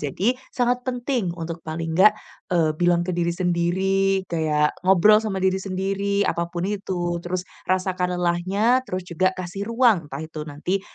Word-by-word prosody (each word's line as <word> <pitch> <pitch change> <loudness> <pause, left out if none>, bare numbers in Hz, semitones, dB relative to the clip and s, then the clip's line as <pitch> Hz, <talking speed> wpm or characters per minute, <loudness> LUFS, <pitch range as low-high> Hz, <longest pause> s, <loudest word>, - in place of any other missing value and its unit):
jadi 180 - 0 0.2
sangat 245 0 0
penting 245 -4 -1
untuk 165 0 -5
paling 160 +1 -4
nggak, 205 +3 +7 0.4
eee, 165 -3 +3
bilang 175 0 +3
ke 185 - -2
diri 170 0 +1
sendiri 190 +2 +1
kayak 155 -2 +1
ngobrol 195 +3 +6
sama 215 -3 -3
diri 190 0 +2
sendiri 195 +1 -1
apa 170 0 -1
pun 175 0 -4
itu. 185 -4 -2
Terus 180 +1 -3 0.2
rasakan 185 -1 0
lelahnya, 185 +8 +2
terus 185 0 -3
juga 185 +2 +2
kasih 185 +3 -5
ruang 230 - +3
entah - - -6
itu 160 -1 -8
nanti 160 +7 -2
185 Hz, 160 wpm, -23 LUFS, 170-195 Hz, 0.4 s, nggak